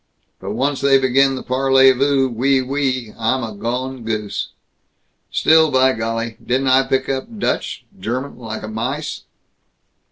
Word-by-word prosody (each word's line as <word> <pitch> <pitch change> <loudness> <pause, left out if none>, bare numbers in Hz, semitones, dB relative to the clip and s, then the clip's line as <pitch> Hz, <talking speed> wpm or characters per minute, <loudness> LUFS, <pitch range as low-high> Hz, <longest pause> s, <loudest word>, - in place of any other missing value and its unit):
But 100 - -5
once 135 +3 -1
they 140 -1 +5
begin 135 +1 +3
the 130 - -6
parlez 135 0 +4
vous, 135 0 +2
oui, 130 +3 +1
oui, 130 -3 -2
I'm 125 +3 0
a 110 -2 -6
gone 125 +4 -4
goose. 110 -2 -3 0.8
Still, 160 0 +4
by 130 -1 +3
golly, 115 0 -3
didn't 130 +2 0
I 130 +1 +4
pick 130 0 0
up 135 -1 -2
Dutch - - -2
German 125 +6 -4
like 110 -2 -6
a - - -5
mice? 125 +8 -4
130 Hz, 150 wpm, -19 LUFS, 115-135 Hz, 0.8 s, they